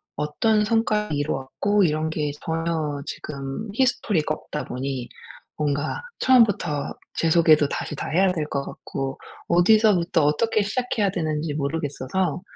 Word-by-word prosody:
어떤 210 Hz, +8 st, +1 dB
성과를 215 Hz, -6 st, +1 dB
이루었고 155 Hz, +8 st, 0 dB
이런 155 Hz, -1 st, +1 dB
게 150 Hz, -2 st, -2 dB
전혀 160 Hz, -3 st, -2 dB
지금 140 Hz, +8 st, -6 dB
히스토리가 210 Hz, -, +1 dB
없다 150 Hz, -, -6 dB
보니 130 Hz, -1 st, -4 dB, 0.5 s
뭔가 145 Hz, -, -1 dB, 0.2 s
처음부터 205 Hz, -, +3 dB, 0.2 s
제 165 Hz, -, +1 dB
소개도 155 Hz, -3 st, +5 dB
다시 150 Hz, -, -4 dB
다 -, -, -5 dB
해야 185 Hz, +3 st, +3 dB
될 160 Hz, -4 st, -2 dB
것 140 Hz, 0 st, -1 dB
같고 135 Hz, -1 st, -5 dB, 0.3 s
어디서부터 175 Hz, -3 st, +4 dB
어떻게 215 Hz, +9 st, +2 dB
시작해야 215 Hz, -2 st, 0 dB
되는지 155 Hz, -3 st, -2 dB
모르겠어서 150 Hz, +4 st, -2 dB
160 Hz, 305 characters per minute, -24 LUFS, 145-205 Hz, 0.5 s, 소개도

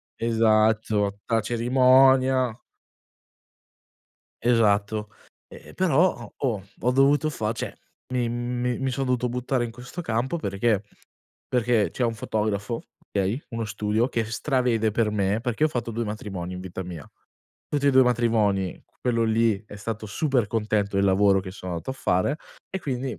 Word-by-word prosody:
esatto, 110 Hz, -2 st, +2 dB
la 115 Hz, -1 st, +1 dB
cerimonia. 130 Hz, +1 st, +4 dB, 1.8 s
Esatto. 105 Hz, -2 st, +2 dB, 0.4 s
Ehm, -, -, -13 dB
però 180 Hz, -1 st, +3 dB
ho 120 Hz, -, -11 dB
oh, 115 Hz, -8 st, -1 dB, 0.2 s
ho 125 Hz, -, +2 dB
dovuto 140 Hz, +4 st, +3 dB
fa 110 Hz, -6 st, -2 dB
cioè 115 Hz, -, -5 dB, 0.4 s
mi 120 Hz, -2 st, 0 dB
mi 120 Hz, +1 st, -2 dB
mi 135 Hz, -1 st, -1 dB
sono 135 Hz, +1 st, -2 dB
dovuto 125 Hz, -1 st, +1 dB
buttare 125 Hz, +1 st, -1 dB
in 115 Hz, -, -4 dB
questo 125 Hz, +8 st, -8 dB
campo 125 Hz, 0 st, -1 dB
perché? 100 Hz, -1 st, 0 dB, 0.7 s
Perché 120 Hz, -3 st, +2 dB
c'è -, -, -4 dB
un 115 Hz, -, 0 dB
fotografo, 110 Hz, 0 st, -2 dB, 0.3 s
okay? 100 Hz, +7 st, -1 dB
Uno 115 Hz, -2 st, -3 dB
studio 105 Hz, +3 st, 0 dB
che 115 Hz, -3 st, -1 dB
stravede 115 Hz, -2 st, 0 dB
per 110 Hz, 0 st, +1 dB
me, 100 Hz, +1 st, 0 dB
perché 120 Hz, +4 st, 0 dB
io 155 Hz, -, +4 dB
ho -, -, -14 dB
fatto 120 Hz, -1 st, -2 dB
2 115 Hz, +1 st, -2 dB
matrimoni 95 Hz, -4 st, -5 dB
in 90 Hz, -, -6 dB
vita 95 Hz, 0 st, -6 dB
mia. 85 Hz, -5 st, -8 dB, 0.6 s
Tutti 145 Hz, -1 st, 0 dB
e -, -, +6 dB
2 130 Hz, 0 st, +6 dB
matrimoni 110 Hz, -6 st, +1 dB, 0.2 s
quello 115 Hz, -2 st, +1 dB
lì 110 Hz, -2 st, +2 dB
è 105 Hz, -, -10 dB
stato 110 Hz, +1 st, -5 dB
super 125 Hz, 0 st, 0 dB
contento 105 Hz, -2 st, -1 dB
del 100 Hz, -, +3 dB
lavoro 95 Hz, 0 st, +4 dB
che 95 Hz, -, -7 dB
sono 95 Hz, -1 st, -7 dB
andato 85 Hz, +9 st, -4 dB
a -, -, -2 dB
fare 110 Hz, +1 st, 0 dB, 0.3 s
e 190 Hz, -, -3 dB
quindi 130 Hz, -3 st, -3 dB
115 Hz, 160 wpm, -25 LUFS, 105-125 Hz, 1.8 s, e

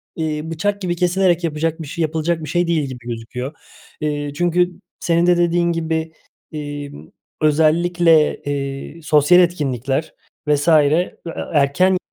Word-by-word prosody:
eee, 155 Hz, -2 st, -2 dB
bıçak 200 Hz, +5 st, -1 dB
gibi 175 Hz, -1 st, -1 dB
kesilerek 180 Hz, 0 st, +2 dB
yapacak 160 Hz, +1 st, -2 dB
bir 150 Hz, -, -7 dB
şey 170 Hz, -, -5 dB
yapılacak 160 Hz, +1 st, -1 dB
bir 155 Hz, -, -6 dB
şey 175 Hz, 0 st, +1 dB
değil 165 Hz, -3 st, +1 dB
gibi 130 Hz, -2 st, -8 dB
gözüküyor. 120 Hz, +4 st, -5 dB, 0.5 s
Eee, 145 Hz, -1 st, -2 dB
çünkü 175 Hz, +1 st, +1 dB, 0.3 s
senin 170 Hz, 0 st, +2 dB
de 175 Hz, -1 st, +4 dB
dediğin 170 Hz, 0 st, +2 dB
gibi, 160 Hz, -1 st, -2 dB, 0.4 s
emm, 145 Hz, -, -7 dB, 0.3 s
özellikle, 160 Hz, +1 st, +3 dB
eee, 140 Hz, +3 st, -4 dB
sosyal 150 Hz, +4 st, +5 dB
etkinlikler 145 Hz, -4 st, -1 dB, 0.3 s
vs. 145 Hz, +1 st, +1 dB
e 155 Hz, +3 st, +3 dB, 0.4 s
erken 160 Hz, +6 st, +3 dB
160 Hz, 135 wpm, -19 LUFS, 145-175 Hz, 0.5 s, sosyal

